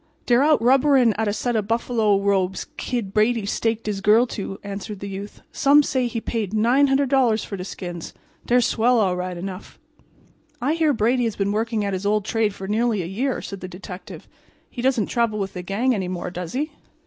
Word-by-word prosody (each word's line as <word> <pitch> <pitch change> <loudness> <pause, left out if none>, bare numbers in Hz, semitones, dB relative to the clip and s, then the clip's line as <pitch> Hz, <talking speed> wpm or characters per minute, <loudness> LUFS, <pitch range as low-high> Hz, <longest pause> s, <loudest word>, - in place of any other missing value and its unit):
"Dey're 240 +1 +4
out 305 +1 +4
rubberin' 260 -2 +4
at 220 0 -1
a - - +2
set 240 +3 -2
of 210 -2 0
buffalo 225 -3 +1
robes 195 -2 0
Kid 230 -6 -3
Brady 220 0 +2
staked 225 +2 -1
his 205 -2 -2
girl 215 +5 +5
to," 195 -2 -5
answered 200 0 -6
the 200 - -6
youth. 200 +1 -8
"Some 290 +1 +5
say 260 -3 0
he 230 -1 -3
paid 220 -3 -3
$900 260 0 +3
for 200 - -6
de 180 - -5
skins. 175 -3 -7 0.4
Dey're 245 +1 +4
swell 240 +1 +2
all 190 -4 +2
right 180 0 -4
enough." 185 +2 -7 0.8
"I 275 +5 +1
hear 320 -2 +2
Brady 245 +1 +1
has 225 - -2
been 200 0 0
working 220 0 -1
at 200 - -2
his 190 +2 -2
old 210 -1 +1
trade 215 -2 0
for 190 - -7
nearly 215 -1 +1
a - - -5
year," 240 +9 -2
said 195 - -7
the 185 - -7
detective. 180 +1 -10 0.4
"He 245 - -5
doesn't 250 -5 +2
travel 230 -3 0
with 195 -1 -3
the 180 - -5
gang 215 +8 0
any 190 -5 -2
more, 180 0 -4
does 175 -1 -6
he?" 295 +4 -2
215 Hz, 205 wpm, -23 LUFS, 195-245 Hz, 0.8 s, girl